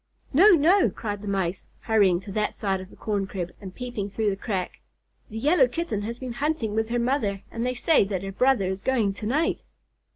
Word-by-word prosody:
"No, 380 +9 +7
no!" 345 +6 +4
cried 205 -3 -5
the 210 - -8
Mice, 190 -2 -1 0.2
hurrying 200 -6 +3
to 195 - -9
that 210 +1 -1
side 195 -2 -1
of 185 - -11
the - - -15
corn 205 -3 -2
crib, 180 -3 -4
and 190 -2 -9
peeping 240 -5 -4
through 210 +1 0
the - - -2
crack. 195 -2 -4 0.5
"The 220 - -7
Yellow 325 - +4
Kitten 330 - -3
has 230 +3 -4
been 255 -1 -6
hunting 275 -5 -1
with 220 +1 0
her 240 - 0
mother, 235 -6 0
and 230 - -3
they 250 +1 -1
say 310 +3 +4
that 195 -2 -3
her 195 - -4
brother 250 0 +2
is 190 0 -5
going 230 -7 +1
to 210 - -6
night." 300 +8 0
215 Hz, 220 wpm, -25 LUFS, 195-255 Hz, 0.5 s, No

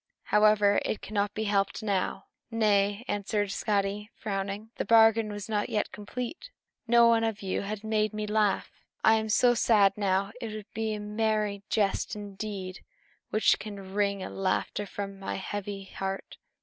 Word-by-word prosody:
However, 210 -1 +4
it 215 - -3
cannot 205 -1 -1
be 220 - -1
helped 200 0 0
now." 200 -3 -1 0.2
"Nay," 210 -1 +2
answered 205 0 -1
Skadi, 205 +1 -1
frowning, 200 +1 -4
"the - - 0
bargain 225 -1 +5
is 205 -1 -6
not 210 -2 -1
yet 210 - -1
complete. 245 - -6 0.4
No 235 0 +6
one 230 -1 +4
of 220 -2 -2
you 190 - -1
has 205 +1 -5
made 215 -1 +1
me 215 0 -3
laugh. 210 -2 +1 0.3
I 220 - +7
am 220 0 -2
so 240 +3 +5
sad 205 -4 +4
now, 195 -1 0
that 225 - -4
it - - -6
will 215 - -6
be 220 -1 -1
a - - -5
merry 210 -1 -1
jest 205 -1 0
indeed 200 -2 -6 0.5
which 215 - +3
can 200 -3 -8
wring 200 -1 +1
laughter 195 +2 -2
from 195 -1 -6
my 195 - -4
heavy 200 +1 -5
heart." 195 0 -5
210 Hz, 160 wpm, -28 LUFS, 200-215 Hz, 0.5 s, I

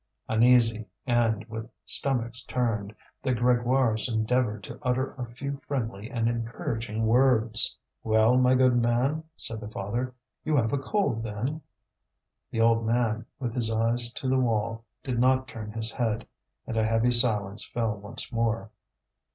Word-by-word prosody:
Uneasy, 115 -1 +4 0.2
and 115 -3 +1
with 110 0 -7 0.2
stomachs 120 -3 +1
turned, 110 -5 -1 0.3
the 130 -2 0
Grégoires 120 -1 +2
endeavoured 110 -1 0
to - - -8
utter 130 0 -1
a 125 -3 -6
few 140 +4 -6
friendly 115 -6 -3
and 115 -3 -1
encouraging 115 -1 -3
words. 115 -1 +4 0.3
"Well, 110 +2 +4
my 130 0 +4
good 130 -1 +4
man," 120 +6 +1
said 115 - -1
the 105 - -7
father, 115 +5 -3 0.3
"you 155 0 0
have 115 -3 +1
a 140 - +1
cold, 165 - 0
then?" 115 +8 -3 0.9
The 115 - -1
old 115 0 +4
man, 115 -1 0
with 120 -4 -3
his 120 -3 0
eyes 115 +2 +2
to 130 - -4
the 130 0 +2
wall, 115 -1 -1 0.2
did 125 -3 -2
not 130 +1 +3
turn 110 -3 -7
his 110 0 -3
head. 115 -2 -1 0.4
And 115 - -4
a 110 - +3
heavy 115 +2 +2
silence 110 -4 +1
fell 115 -3 -2
once 100 +4 -6
more. 115 -2 -1
115 Hz, 150 wpm, -27 LUFS, 110-125 Hz, 0.9 s, Uneasy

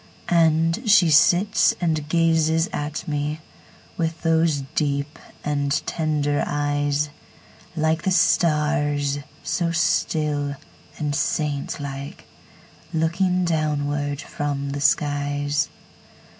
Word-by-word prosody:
And 165 +5 +2
she 180 -6 +6
sits 185 +8 +4
and 155 -4 -1
gazes 165 0 +2
at 150 +2 -3
meWith 155 +2 -5
those 160 -3 +2
deep 145 0 -1 0.2
and 145 -1 -1
tender 150 -2 0
eyes, 145 0 0 0.6
Like 160 +1 +1
the - - 0
stars, 150 -5 +2 0.2
so 170 -1 -1
still 150 -3 0 0.4
and 150 -2 -2
saint 145 0 -1
like, 140 0 -7 0.7
Looking 180 +3 +1
downward 145 -3 -1
from 140 -1 -3
the 140 0 -4
skies. 145 0 +1
150 Hz, 90 wpm, -23 LUFS, 145-165 Hz, 0.7 s, she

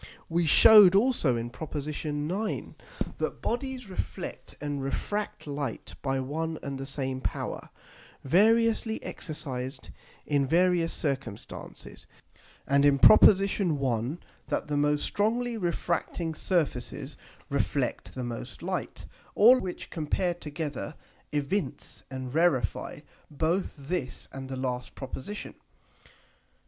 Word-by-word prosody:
We 170 0 +1
shewed 205 +3 +9
also 200 - +3
in 115 +1 -4
Prop. 155 +4 -7
9. 150 +7 -3 0.4
that - - -2
Bodies 255 -1 -2
reflect 185 - -6
and 145 -1 -3
refract 205 +9 -3
Light 140 -5 -4
by 135 -1 0
one 160 +5 -2
and 140 -1 -4
the 135 - -5
same 135 -1 -3
power, - - -4 0.5
variously 220 - +3
exercised 135 -5 -5 0.3
in 140 -2 +1
various 175 +1 +3
circumstances; 135 -8 -5 0.6
and 140 0 +3
in 145 -1 +5
Prop. 215 - +8
1. 155 - +2 0.3
that - - -1
the 150 - -1
most 145 0 +2
strongly 235 +3 0
refracting 170 -3 -1
Surfaces 150 -5 -1 0.4
reflect 140 -2 -1
the 130 - -3
most 120 -1 -6
Light: - - -4 0.3
All 245 +5 +8
which 185 -4 -6
compared 175 +2 -1
together 150 0 -4 0.4
evince 145 +1 -2
and 130 -1 -6
rarify 145 - +1 0.3
both 160 +6 -1
this 140 -2 -4
and 135 -1 -7
the 130 - -4
last 125 -1 -3
Proposition. 135 +9 -6
150 Hz, 110 wpm, -28 LUFS, 135-185 Hz, 0.6 s, shewed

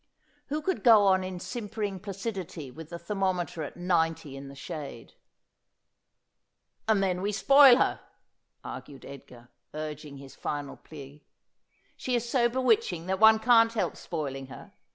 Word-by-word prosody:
Who 300 +2 -3
could 375 +3 -2
go 220 -5 +7
on 190 -1 +3
in 185 -1 -5
simpering 210 -2 -4
placidity 190 - -6
with 160 +3 -11
the 170 - -6
ther 170 +4 -6
mometer 180 -5 -1
at 150 - -8
ninety 165 -5 0
in 135 0 -9
the 140 - -11
shade? 140 -5 -8 0.9
' - - -51
And 215 -3 +3
then 180 -1 0
we 205 +2 -1
spoil 275 +4 +7
her,' - - +1 0.6
argued 140 -2 -9
Edgar, 125 -3 -12 0.3
urging 150 -2 -6
his 135 0 -12
final 145 -1 -4
plea. 145 -1 -13 0.4
' - - -41
She 255 - -2
is 240 0 -1
so 240 -1 +2
bewitching 260 - +1
that 190 +1 -2
one 220 0 +7
can't 230 0 +4
help 225 - -1
spoiling 135 -5 -5
her. 135 - -12
185 Hz, 155 wpm, -28 LUFS, 150-220 Hz, 0.9 s, go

